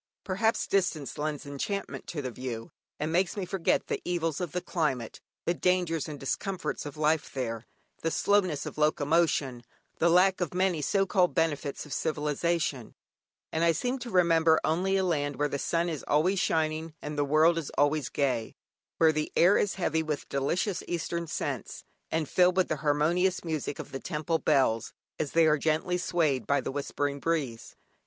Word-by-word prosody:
Perhaps 215 Hz, +4 st, +1 dB
distance 175 Hz, -9 st, -1 dB
lends 150 Hz, -1 st, -3 dB
enchantment 165 Hz, +8 st, -4 dB
to 150 Hz, -4 st, -4 dB
the 130 Hz, -, -3 dB
view, 120 Hz, -2 st, -6 dB, 0.3 s
and 155 Hz, +1 st, -1 dB
makes 180 Hz, +4 st, +1 dB
me 195 Hz, -, -2 dB
forget 180 Hz, -1 st, 0 dB
the -, -, -3 dB
evils 165 Hz, -2 st, -1 dB
of 175 Hz, -4 st, -3 dB
the 180 Hz, -, -1 dB
climate, 145 Hz, -10 st, -2 dB, 0.2 s
the 170 Hz, -, +2 dB
dangers 175 Hz, -3 st, +1 dB
and 145 Hz, -2 st, -7 dB
discomforts 165 Hz, +2 st, -3 dB
of 145 Hz, +1 st, -9 dB
life 155 Hz, +1 st, +1 dB
there, 115 Hz, -4 st, -4 dB, 0.3 s
the 165 Hz, -, 0 dB
slowness 185 Hz, -5 st, +1 dB
of -, -, -7 dB
locomotion, 150 Hz, -4 st, +1 dB, 0.4 s
the 170 Hz, -, +4 dB
lack 185 Hz, +2 st, +4 dB
of 175 Hz, -1 st, -2 dB
many 185 Hz, -4 st, +1 dB
so 195 Hz, +7 st, +2 dB
called 185 Hz, -2 st, +2 dB
benefits 150 Hz, -4 st, -1 dB
of 145 Hz, -, -7 dB
civilisation; 150 Hz, -3 st, -1 dB, 0.6 s
and 160 Hz, -, 0 dB
I 170 Hz, 0 st, +4 dB
seem 250 Hz, +9 st, -2 dB
to 245 Hz, -, -6 dB
remember 165 Hz, -4 st, +4 dB
only 185 Hz, +5 st, +1 dB
a 190 Hz, -, +1 dB
land 145 Hz, -5 st, 0 dB
where 145 Hz, +3 st, +1 dB
the 140 Hz, -, -3 dB
sun 170 Hz, +4 st, 0 dB
is 160 Hz, -5 st, -4 dB
always 180 Hz, +6 st, +2 dB
shining 160 Hz, 0 st, 0 dB
and 150 Hz, 0 st, -6 dB
the 145 Hz, -, +1 dB
world 155 Hz, +4 st, +4 dB
is 155 Hz, -, -5 dB
always 145 Hz, -2 st, +2 dB
gay; 130 Hz, -6 st, -1 dB, 0.4 s
where 160 Hz, -1 st, +5 dB
the 155 Hz, 0 st, -2 dB
air 180 Hz, +4 st, +6 dB
is 205 Hz, -, +1 dB
heavy 160 Hz, -4 st, 0 dB
with 155 Hz, -2 st, -3 dB
delicious 170 Hz, +7 st, 0 dB
eastern 170 Hz, 0 st, -2 dB
scents, -, -, -4 dB, 0.3 s
and 160 Hz, -2 st, -1 dB
filled 180 Hz, +3 st, +3 dB
with 185 Hz, -, +3 dB
the 155 Hz, -, 0 dB
harmonious 155 Hz, +6 st, +1 dB
music 155 Hz, -3 st, -3 dB
of -, -, -8 dB
the 135 Hz, -, -4 dB
temple 160 Hz, +1 st, -2 dB
bells, 130 Hz, -7 st, +2 dB, 0.3 s
as 150 Hz, -, -2 dB
they 165 Hz, 0 st, +5 dB
are 155 Hz, -1 st, +3 dB
gently 160 Hz, +4 st, 0 dB
swayed 155 Hz, -, 0 dB
by 140 Hz, +3 st, +3 dB
the -, -, -4 dB
whispering 145 Hz, 0 st, -2 dB
breeze. 140 Hz, -8 st, -2 dB
160 Hz, 180 wpm, -29 LUFS, 145-175 Hz, 0.6 s, air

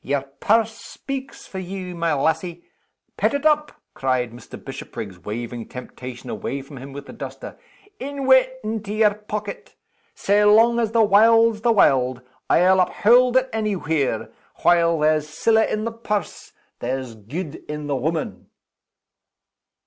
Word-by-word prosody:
"Your 140 Hz, 0 st, 0 dB
purse 220 Hz, +11 st, +1 dB
speaks 275 Hz, 0 st, -7 dB
for 190 Hz, -, -7 dB
you, 185 Hz, 0 st, -6 dB
my 170 Hz, -1 st, -1 dB
lassie. 160 Hz, +4 st, -1 dB, 0.5 s
Pet -, -, +1 dB
it 285 Hz, +2 st, -3 dB
up!" 300 Hz, -1 st, +3 dB, 0.2 s
cried 130 Hz, -3 st, -1 dB
Mr. 120 Hz, +1 st, -11 dB
Bishopriggs, 95 Hz, -4 st, -8 dB
waving 115 Hz, +4 st, -6 dB
temptation 125 Hz, 0 st, -9 dB
away 135 Hz, +2 st, -4 dB
from 140 Hz, 0 st, -12 dB
him 135 Hz, +2 st, -9 dB
with 140 Hz, +1 st, -8 dB
the -, -, -11 dB
duster. -, -, -8 dB, 0.4 s
"In 280 Hz, 0 st, -5 dB
wi' 260 Hz, 0 st, +8 dB
it 260 Hz, 0 st, -1 dB
into 215 Hz, -1 st, -4 dB
yer 215 Hz, -1 st, +4 dB
pocket! 210 Hz, -1 st, -7 dB, 0.4 s
Sae 205 Hz, +1 st, +2 dB
long 225 Hz, +3 st, +5 dB
as 225 Hz, -2 st, 0 dB
the 230 Hz, -1 st, +5 dB
warld's 225 Hz, +2 st, +5 dB
the 235 Hz, -, +3 dB
warld, 130 Hz, -, +3 dB, 0.3 s
I'll 185 Hz, +2 st, +5 dB
uphaud 245 Hz, +7 st, +4 dB
it 260 Hz, 0 st, +3 dB
any 215 Hz, -2 st, 0 dB
where 160 Hz, -6 st, -1 dB, 0.3 s
while 170 Hz, -1 st, +4 dB
there's 155 Hz, 0 st, +1 dB
siller 220 Hz, +8 st, +2 dB
in 215 Hz, -1 st, -1 dB
the 230 Hz, -, -2 dB
purse, 210 Hz, -5 st, -4 dB, 0.3 s
there's 130 Hz, -1 st, -3 dB
gude 140 Hz, -, -6 dB
in 150 Hz, 0 st, -4 dB
the 145 Hz, -1 st, -1 dB
woman!" 155 Hz, +4 st, -3 dB
185 Hz, 150 wpm, -22 LUFS, 140-225 Hz, 0.5 s, wi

